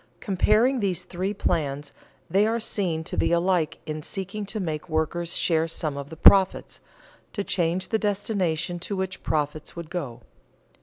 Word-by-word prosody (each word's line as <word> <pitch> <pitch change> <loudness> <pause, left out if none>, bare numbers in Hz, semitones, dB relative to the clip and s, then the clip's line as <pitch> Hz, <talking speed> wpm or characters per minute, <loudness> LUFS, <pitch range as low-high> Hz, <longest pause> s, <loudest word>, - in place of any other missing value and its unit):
_ - - -36
Comparing 215 +6 +3
these 190 -5 0
three 185 +2 -3
plans, 150 -7 -1 0.3
they 200 +3 +3
are 230 +1 0
seen 180 -7 -1
to - - -5
be - - +1
alike 170 -2 +2
in 155 0 -4
seeking 195 +5 -5
to 215 +2 -3
make 160 -3 -3
workers 165 +2 -1
share 165 -1 +2
some 155 -3 -3
of 140 0 -6
the 160 - -9
profits, 190 +3 +5 0.5
to 200 - -2
change 175 -1 0
the 220 - +1
destination 190 -5 -1
to 200 +3 -3
which 190 0 -3
profits 150 0 -2
would 170 -1 -7
go. 145 -10 -4
175 Hz, 165 wpm, -25 LUFS, 160-200 Hz, 0.5 s, profits